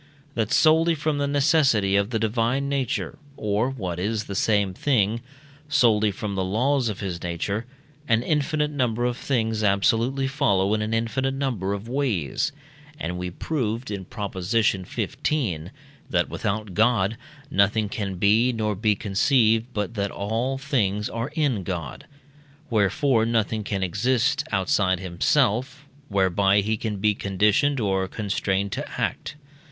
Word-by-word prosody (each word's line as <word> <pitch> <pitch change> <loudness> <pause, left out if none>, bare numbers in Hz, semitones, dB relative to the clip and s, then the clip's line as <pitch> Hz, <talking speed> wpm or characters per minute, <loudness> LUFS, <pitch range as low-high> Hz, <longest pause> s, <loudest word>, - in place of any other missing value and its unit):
that 115 -3 -1
solely 165 +1 +4
from 150 -1 -1
the 140 - 0
necessity 140 -9 +3
of 100 +1 +2
the 120 - -1
divine 115 +5 0
nature, 140 -2 -2 0.2
or, 105 +3 0
what 95 -10 -4
is 105 +3 -1
the 100 - -7
same 100 -1 +1
thing, 115 -1 +1 0.5
solely 115 -8 +4
from 100 +1 -5
the 95 -1 -1
laws 125 +6 +1
of 105 - -5
his 90 -4 -4
nature, 100 +7 -3 0.4
an 115 0 +3
infinite 150 0 0
number 120 -4 0
of 125 -1 0
things 115 -4 -1
absolutely 115 +6 +2
follow 105 -9 +1
in 110 - 0
an 110 +1 -2
infinite 130 +4 0
number 120 -9 -2
of 100 +2 -4
ways; 120 - -1 0.5
and 90 +2 -3
we 90 0 -3
proved 115 - -3
(in 100 -2 -4
Prop. 100 +2 -6
xv.), 95 - -1 0.4
that 85 -2 +1
without 105 -2 -3
God 110 0 +2 0.4
nothing 105 +1 +2
can 100 -2 -4
be 110 +7 +3
nor 110 -3 -1
be 105 +1 +1
conceived 110 +3 +2
but 105 -2 -3
that 100 -2 -1
all 115 +8 -2
things 105 -8 -1
are 115 +3 -3
in 140 -10 +1
God. 85 -7 -5 0.6
Wherefore 115 +3 +2
nothing 110 -1 0
can 100 -2 -2
exist; 125 - +1
outside 95 -1 +1
himself, 130 +9 0 0.2
whereby 100 0 +3
he 110 +2 0
can 105 -1 -3
be 105 +2 +2
conditioned 105 +8 +1
or 95 -3 0
constrained 100 -1 -1
to - - -5
act. - - -2
110 Hz, 145 wpm, -24 LUFS, 100-130 Hz, 0.6 s, solely